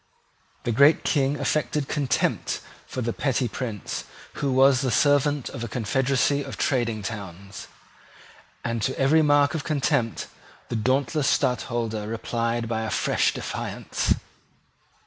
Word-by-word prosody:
The 120 - 0
great 140 +7 +5
King 140 0 +1
affected 150 -2 0
contempt 140 -6 0 0.3
for 130 - -4
the 115 0 -1
petty 130 -3 0
Prince 110 -3 -5 0.4
who 140 -2 +1
was 130 0 +5
the 130 - 0
servant 145 +2 +2
of 120 - -6
a - - -3
confederacy 135 +4 +1
of - - -7
trading 115 -5 0
towns; 100 -2 -7 1.0
and 115 -1 -1
to 130 - -1
every 145 +4 +5
mark 145 -1 +4
of 155 - -2
contempt 140 -6 0 0.4
the - - -2
dauntless 135 +5 +1
Stadtholder 120 -5 0
replied 115 +1 -2
by 110 -1 -1
a 110 - -2
fresh - - +2
defiance. - - -2
130 Hz, 130 wpm, -25 LUFS, 115-140 Hz, 1.0 s, great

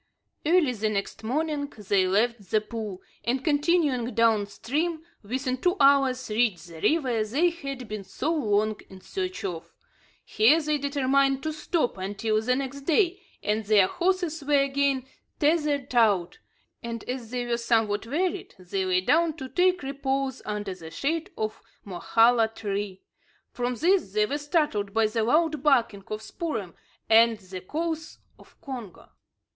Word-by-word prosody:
Early 325 -3 +3
the 220 -2 -1
next 200 +1 -3
morning 290 +4 -1
they 200 -2 +1
left 210 0 0
the 215 - +3
pool, 215 -3 -6 0.2
and, 255 +2 -1
continuing 290 -5 +2
down 225 -3 +3
stream, 315 +10 -2 0.2
within 255 +4 -2
two 355 +8 +1
hours 275 -2 +4
reached 210 -6 0
the 165 -1 -11
river 255 -9 +2
they 290 +12 +2
had 275 -7 -7
been 210 -1 -5
so 255 - -2
long 215 -7 +1
in 190 -1 -12
search 370 - -4
of. 170 -4 -5 0.5
Here 245 +10 +4
they 300 -1 0
determined 275 -1 +1
to 315 0 -2
stop 305 - -1
until 205 +3 -1
the 250 +3 +1
next 275 +1 -4
day, 355 +5 +2 0.2
and 215 +1 0
their 205 -2 +5
horses 345 - -1
were 285 -1 +3
again 275 -1 0 0.3
tethered 295 -3 +1
out; 205 -7 +2 0.4
and, 230 -1 -5
as 250 -3 -4
they 245 0 -3
were 240 -1 0
somewhat 225 -2 +1
wearied, 360 +8 -2
they 190 +1 -3
lay 185 0 +2
down 325 - +3
to 265 -4 -6
take 365 0 +2
repose 270 -1 -2
under 205 -2 -3
the 165 -3 -10
shade 315 - -2
of 215 0 -3 0.2
a - - -11
mokhala 225 +5 +3
tree. 205 -3 -4 0.5
From 245 0 -2
this 335 - +2
they 210 0 +3
were 285 +7 -2
startled 290 - 0
by 225 0 +4
the 220 +1 0
loud 305 +4 +2
barking 235 -9 +2
of 215 0 -5
Spoor'em 220 - -4 0.3
and 225 0 +5
the 185 -2 -9
calls 315 - -4 0.2
of - - -20
Congo. 250 - -8
250 Hz, 155 wpm, -26 LUFS, 210-295 Hz, 0.5 s, their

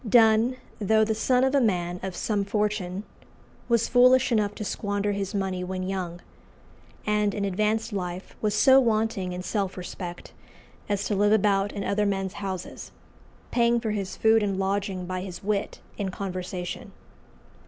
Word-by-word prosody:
Donne, 225 +2 +5 0.2
though 220 +1 +3
the 220 - 0
son 250 +4 +2
of 265 +1 +2
a 280 - +4
man 180 -5 0
of 190 -1 -5
some 205 -2 0
fortune, 205 -2 -1 0.7
was 235 -1 +3
foolish 255 +1 +5
enough 210 -3 +1
to 215 - -5
squander 205 0 -1
his 200 0 -3
money 190 -2 -1
when 185 0 -3
young, 185 -2 -4 0.8
and 210 -1 +1
in 200 - -1
advanced 215 +3 0
life 180 -1 -5
was 210 -1 +1
so 265 +4 +7
wanting 220 -6 0
in 180 0 -5
self 195 -2 -2
respect 180 -1 -7 0.6
as 205 -1 0
to - - -1
live 205 +1 +3
about 200 -1 +2
in 200 - -4
other 205 +1 +1
men's 195 -1 -1
houses, 190 -3 -6 0.6
paying 235 0 +3
for 225 -2 -2
his 200 -3 -3
food 220 0 +4
and 200 -2 -1
lodging 195 -1 -1
by 185 0 -3
his 185 -1 -7
wit 205 0 -2 0.2
and 195 -2 -1
conversation. 185 -2 -5
200 Hz, 165 wpm, -26 LUFS, 190-220 Hz, 0.8 s, so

